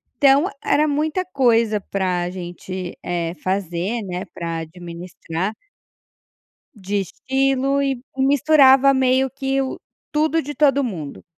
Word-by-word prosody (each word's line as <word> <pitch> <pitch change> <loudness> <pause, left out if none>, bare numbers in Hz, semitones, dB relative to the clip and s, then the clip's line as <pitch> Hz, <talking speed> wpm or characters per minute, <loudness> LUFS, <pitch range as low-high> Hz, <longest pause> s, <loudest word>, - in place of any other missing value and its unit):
Então, 280 +2 +5 0.2
era 305 +1 +3
muita 310 +5 -1
coisa 230 - +2
para 180 -3 -1
gente, 180 0 -7
eh, 170 -1 -2
fazer, 190 +3 -2
né, 180 -1 -4
para 165 -1 -4
administrar. 170 +3 -6 1.2
De 205 0 -3
estilo 270 +6 0
e 270 -3 -1 0.2
misturava 275 0 +5
meio 260 0 +2
que 270 0 -1
o 265 - -4 0.3
tudo 310 +1 +1
de 295 +1 -6
todo 280 -1 +3
mundo. 165 - -6
240 Hz, 115 wpm, -21 LUFS, 180-275 Hz, 1.2 s, Então